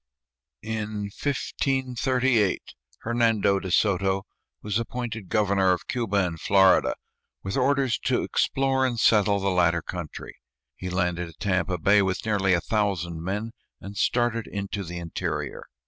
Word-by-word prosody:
In 105 -2 -4
1538 130 -5 0 0.4
Hernando 110 -4 +2
de 95 - -6
Soto 95 0 +2 0.4
was 105 +1 0
appointed 115 -4 -5
governor 100 -3 +3
of 90 - -5
Cuba 105 -6 0
and 85 -2 -5
Florida, 95 -1 +4 0.5
with 95 - -3
orders 135 -1 +2
to - - +1
explore 135 -1 +1
and 125 -3 0
settle 105 -2 +4
the 100 0 0
latter 85 -2 +2
country. 90 -4 -7 0.4
He 90 - -6
landed 90 -1 -1
at 80 - -17
Tampa 95 -2 0
Bay 100 +5 +4
with 95 +3 -1
nearly 100 -4 +2
a 85 - 0
thousand 90 -6 -1
men 105 +6 -3 0.3
and 100 +1 -9
started 120 0 +1
into 100 0 -4
the 90 0 -7
interior. 85 -2 -4
100 Hz, 135 wpm, -25 LUFS, 95-115 Hz, 0.5 s, Florida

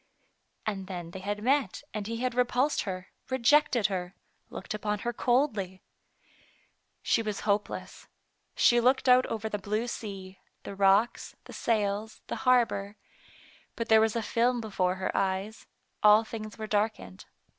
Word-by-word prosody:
And 195 -3 -3
then 175 -3 -6
they 190 - -7
had 205 +2 -4
met 275 +3 +1
and 210 -1 -4
he 230 0 -3
had 255 -1 0
repulsed 250 +3 +1
her, 185 0 -6 0.2
rejected 260 -2 +3
her, 185 -1 -2 0.3
looked - - -6
upon 210 0 -2
her 240 - -1
coldly! 220 -8 0 1.2
She - - +2
was 210 -3 -4
hopeless. 205 0 -2 0.5
She 240 - +5
looked 255 +3 +2
out 255 0 +6
over 220 -1 -3
the 210 -1 -3
blue 210 +3 -2
sea, 195 -5 -7 0.2
the - - -7
rocks, 195 +4 +2
the - - -12
sails, 210 -1 -1
the - - -4
harbor, 215 -5 +2 0.8
but 230 0 -4
there 220 -1 +7
was 220 0 +1
a 230 - -1
film 240 +3 +1
before 185 -5 -1
her 190 0 -3
eyes, 195 +3 -2 0.3
all 210 +1 +7
things 215 -1 -8
were 220 - -5
darkened. 205 - -2
215 Hz, 150 wpm, -29 LUFS, 195-235 Hz, 1.2 s, there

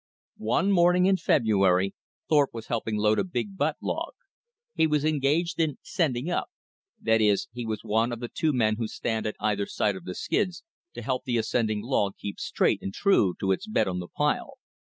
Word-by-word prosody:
One 115 - +1
morning 180 0 +4
in 190 0 +4
February, 100 - +2 0.3
Thorpe 145 -5 +3
was 115 -1 -6
helping 110 -2 -2
load 105 +1 +3
a - - +2
big 195 +2 -4
butt - - 0
log. - - -3 0.6
He 160 - +3
was 150 -1 +1
engaged 155 +3 +1
in 155 -4 +1
"sending 140 -6 -1
up"; 175 - -1 0.5
that 110 0 +2
is, 105 +3 +2
he 120 -1 -5
was 110 -2 -3
one 115 +3 +1
of 120 - -4
the 120 - -4
two 155 +5 0
men 110 -5 +1
who 115 -1 -2
stand 110 0 -2
at 105 - -3
either 105 -1 0
side 105 -2 0
of 90 -2 -10
the 90 0 -5
skids 185 -3 -1 0.3
to - - -6
help 130 -2 -2
the 120 -2 0
ascending 110 -2 0
log 105 -6 0
keep 100 - -6
straight - - +1
and 95 - -5
true 110 - +3
to 95 - +1
its 195 - -1
bed 110 - +1
on 90 -1 -2
the 90 - -6
pile. - - -1
115 Hz, 200 wpm, -27 LUFS, 105-155 Hz, 0.6 s, morning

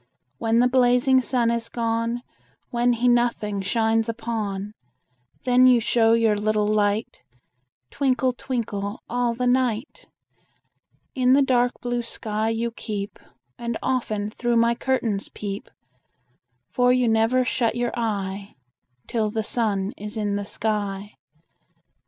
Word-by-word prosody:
When 225 0 +1
the 245 +1 +5
blazing 250 +1 +4
sun 245 -2 +1
is 235 -1 -2
gone, 230 +1 -1 0.5
When 240 0 +2
he 240 +1 0
nothing 240 -4 +1
shines 225 +2 +1
upon, 215 -3 -3 0.7
Then 250 0 +5
you 250 -2 +6
show 225 0 +3
your 225 -2 +3
little 210 0 +1
light, 210 0 0 0.7
Twinkle, 260 -2 +1
twinkle, 215 -5 -4
all 240 0 0
the 250 +1 -2
night. 250 0 0 1.1
In 255 -1 +3
the 280 +1 +5
dark 245 -2 +2
blue 245 0 -1
sky 220 -1 -3
you 230 +1 -1
keep, 205 -3 -6 0.4
And 235 -1 -3
often 215 -5 -1
through 240 +1 0
my 230 0 +4
curtains 235 -5 -1
peep; 200 -1 -6 1.0
For 250 0 +3
you 250 -1 +3
never 225 +3 +3
shut 245 -4 0
your 240 0 -1
eye 200 -3 -3 0.5
Till 220 -3 -1
the 220 +1 -2
sun 205 -4 -1
is 210 +2 -7
in 205 -2 -1
the 205 0 -3
sky. 205 -1 -2
230 Hz, 130 wpm, -24 LUFS, 210-245 Hz, 1.1 s, you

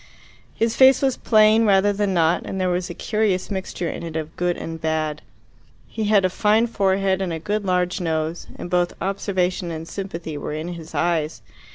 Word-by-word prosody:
His 225 0 0
face 265 0 +6
was 265 -2 +2
plain 215 0 +4
rather 205 -1 +4
than 205 0 0
not, 165 -2 +2
and 190 - -5
there 185 -1 +1
was 180 +1 -2
a 175 - -6
curious 210 -4 -1
mixture 190 -2 -3
in - - -5
it 165 -1 -7
of 160 0 -4
good 175 0 0
and 165 -1 -6
bad. 155 -1 -1 0.6
He 220 -1 -4
had 205 -2 +4
a - - +2
fine 215 +4 +3
forehead 195 -3 +1
and 185 -2 -2
a 165 - -2
good 205 +5 -2
large 180 -1 0
nose, 160 0 -2
and - - -7
both 175 -1 +1
observation 185 -2 -1
and 165 0 -6
sympathy 170 -6 -6
were 150 - -5
in 155 +3 -4
his 165 -2 -8
eyes. 160 -3 0
185 Hz, 195 wpm, -22 LUFS, 165-205 Hz, 0.6 s, face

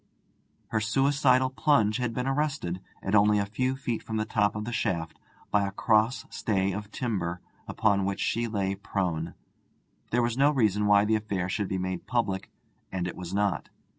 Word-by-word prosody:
Her 110 - +1
suicidal 130 +3 +3
plunge 130 -6 +3
had 125 -2 -1
been 125 +2 -2
arrested, 135 - -1 0.2
at 95 - -2
only 105 0 +5
a 100 - +1
few 130 +6 -1
feet 120 -4 -3
from 110 - -4
the 110 - 0
top 105 -2 +1
of 105 0 -3
the 120 - -4
shaft, 85 -6 -2 0.3
by 100 -1 +3
a - - -4
cross 110 +3 +2
stay 100 -2 0
of 100 +2 -5
timber, 95 -9 -2 0.3
upon 100 -3 +2
which 100 0 -2
she 115 0 0
lay 100 -3 -1
prone. 90 -4 -2 0.7
There 120 +1 +2
was 120 +2 -1
no 140 +1 +6
reason 105 -7 +2
why 100 0 +5
the 110 +1 +2
affair 100 -4 -3
should 100 +1 -1
be 95 - -2
made 95 0 -4
public, 100 -5 -1 0.4
and 90 -1 -2
it 90 - -5
was 90 -1 -7
not. 100 -3 0
105 Hz, 185 wpm, -28 LUFS, 95-120 Hz, 0.7 s, no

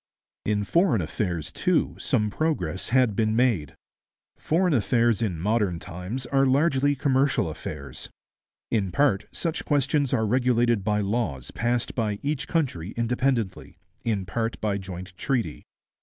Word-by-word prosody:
In 105 -1 +1
foreign 170 - +3
affairs, 85 -1 -2
too, - - +1
some 105 -1 +1
progress 95 - -1
had 125 -4 +3
been 110 0 +1
made. 115 - +1 0.6
Foreign 175 +2 +1
affairs 115 -1 +2
in 100 -7 -1
modern 100 -1 +1
times 90 +9 -6
are 135 +2 +2
largely 140 +1 +3
commercial 135 - +2
affairs. 75 -2 -7 0.6
In 100 -5 +1
part 120 -2 +2
such 165 -2 -2
questions 145 -1 +1
are 110 -4 +2
regulated 120 -2 +2
by 105 0 +1
laws 100 - -2
passed 120 +1 -1
by 105 -4 -1
each 145 -1 -1
country 115 - -1
independently, 120 -3 -1 0.3
in 105 -5 -1
part 115 +5 -2
by 100 -2 -1
joint 95 -1 -8
treaty. 115 - -1
115 Hz, 135 wpm, -26 LUFS, 95-130 Hz, 0.6 s, foreign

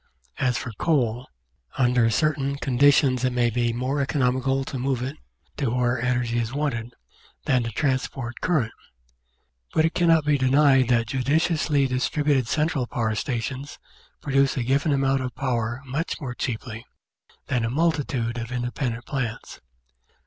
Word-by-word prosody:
As 125 -3 +1
for 115 - -5
coal, 125 -6 +1 0.5
under 125 -3 +3
certain 140 +2 0
conditions 135 -1 +3
it 130 - +2
may 120 -1 +2
be 120 0 +1
more 130 +4 -1
eco 140 +2 -2
nomical 130 +1 +1
to 130 - -5
move 130 -1 -1
it 130 +2 -4 0.4
to 135 -5 0
where 120 0 0
energy 120 -1 0
is 115 0 -2
wanted, 125 -5 -2 0.5
than 130 -2 +3
to 115 - -3
transport 130 -2 -2
current; 150 -11 +1 1.0
but 160 - +4
it 165 - 0
cannot 165 -3 +3
be 145 -1 +2
denied 135 0 +4
that 120 -2 +2
judiciously 145 +3 +1
distributed 135 0 +1
cen 155 +5 +1
tral 130 -6 -2
power 110 -2 -1
stations 130 +3 -4 0.5
produce 135 -1 +2
a 125 - 0
given 140 +5 +1
amount 135 -1 +2
of 125 -2 -5
power 120 -1 -2
much 140 +6 -3
more 130 -6 -5
cheaply 115 -2 -4 0.6
than 125 -3 -1
a 115 - 0
multitude 135 -5 0
of 115 +1 -6
independent 120 -1 -3
plants. 125 -6 -4
130 Hz, 150 wpm, -24 LUFS, 120-140 Hz, 1.0 s, but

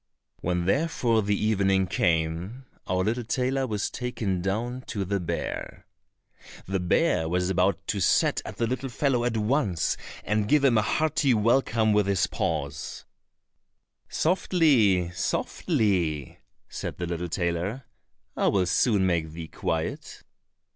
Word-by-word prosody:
When 90 0 -1
therefore 120 - +1
the 100 0 0
evening 95 -3 +2
came, 90 +7 -1 0.2
our 95 0 +1
little 115 +4 -1
tailor 130 +3 0
was 105 -3 -2
taken 110 -7 -2
down 115 +7 -2
to 100 -2 -3
the 100 +2 -1
bear. 85 - -4 0.8
The 95 +1 -1
bear 90 - +1
was 90 +2 0
about 95 +2 +1
to 100 - 0
set 90 - +2
at - - -8
the 115 - +1
little 130 +3 -3
fellow 125 -1 0
at 120 -2 0
once, 105 - 0 0.3
and 105 -1 0
give 150 +4 +3
him 130 -4 +4
a - - +3
hearty 145 +1 +1
welcome 110 -1 +2
with 105 -1 +2
his 100 -2 +2
paws: 75 -8 -3 1.0
"Softly, 135 - +2
softly," 90 - -1 0.3
said - - -6
the 90 - -3
little 85 0 -3
tailor, 90 +8 -2 0.5
"I - - +1
will 95 -2 +2
soon 100 +2 +2
make 85 -3 0
thee 80 -1 -7
quiet." 80 -1 -4
100 Hz, 135 wpm, -26 LUFS, 90-120 Hz, 1.0 s, him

